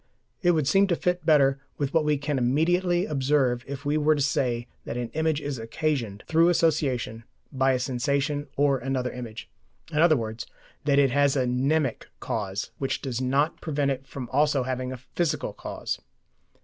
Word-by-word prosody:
It 175 -1 +4
would 155 -4 +1
seem 195 +5 +4
to 175 - +2
fit 180 +1 -1
better 140 -3 +4 0.2
with 140 -2 -2
what 160 - +3
we 150 -1 +2
can 145 -1 -1
immediately 175 +8 +2
observe 135 -4 +1
if 140 +1 -6
we 145 +1 +1
were 155 +1 +4
to 145 - -1
say 120 -3 0 0.2
that 115 - -5
an 120 -1 -3
image 160 -1 0
is 145 -4 -4
occasioned, 115 -4 -2
through 165 +2 +4
association, 140 -9 +1 0.3
by 135 -1 +2
a 130 - 0
sensation 140 +3 -1
or 140 -1 +3
another 130 -1 -2
image, 120 -3 -7 0.4
in 150 - 0
other 160 -2 +6
words 110 -1 -5 0.4
that 140 -1 +3
it 140 -2 +4
has 140 +1 +3
a 130 -2 +2
mnemic 135 +2 0
cause 100 -2 -3
which 135 - -1
does 130 -3 -2
not 140 +5 +1
prevent 145 -3 0
it 135 0 -5
from 130 -3 -6
also 145 -1 +2
having 130 0 -3
a 130 - -5
physical 150 +5 -2
cause. - - -5
140 Hz, 180 wpm, -26 LUFS, 125-150 Hz, 0.4 s, other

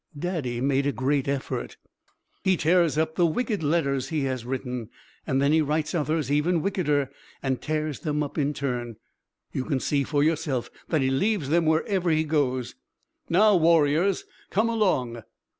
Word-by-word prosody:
Daddy 145 -8 -2
made 140 +1 +1
a - - +2
great 135 +1 0
effort. 135 - -3 0.7
"He 190 -1 +3
tears 165 -1 +3
up 160 0 +1
the 175 +1 +3
wicked 210 +4 -1
letters 140 -4 0
he 160 -3 -1
has 130 -3 -2
written. 125 -3 -4 0.4
Then 140 +2 +2
he 160 +1 +4
writes 155 +1 -1
others 155 -3 0
even 160 +3 +2
wickeder 150 -8 0 0.3
and 130 -2 -1
tears 155 -1 -2
them 150 -1 -1
up 145 - -6
in 145 -1 0
turn. 120 -4 -3 0.6
You 130 - -2
can 135 -1 -1
see 140 +1 0
for 145 0 +1
yourself 150 -5 0 0.2
that 155 -4 +2
he 130 0 +1
leaves 180 +1 0
them 165 +1 +2
wherever 175 +3 +1
he 155 -1 +3
goes. 140 -5 0 0.6
Now, 205 +4 +5
warriors, 165 +2 +3 0.2
come 220 +3 +1
along!" 130 - 0
150 Hz, 160 wpm, -26 LUFS, 135-165 Hz, 0.7 s, Now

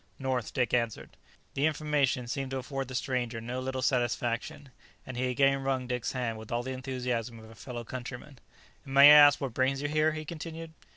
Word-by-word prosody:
"North," 130 -4 -2
Dick 125 -3 -1
answered. 115 -3 -1 0.4
The 140 +3 +2
information 145 -4 0
seemed 135 +2 -4
to 135 - -3
afford 135 +1 -4
the 130 - -7
stranger 125 -3 -2
no 120 +3 -5
little 130 0 -3
satisfaction, 120 +1 -1 0.3
and 130 - -7
he 130 +1 -1
again 135 +2 +2
wrung 135 -1 -1
Dick's 125 -1 -3
hand 120 -4 -3
with 110 - -11
all 120 +1 -1
the 130 - -5
enthusiasm 125 -3 -3
of 110 0 -13
a - - -12
fellow 120 +1 -7
countryman. 125 +3 -8 0.4
"And 135 -2 -7
may 140 +1 +10
I - - +11
ask 145 -1 +8
what 135 -4 -4
brings 130 +2 +1
you 145 - -2
here?" 155 +1 +2
he 155 0 -6
continued. 165 0 -7
130 Hz, 205 wpm, -29 LUFS, 120-140 Hz, 0.4 s, I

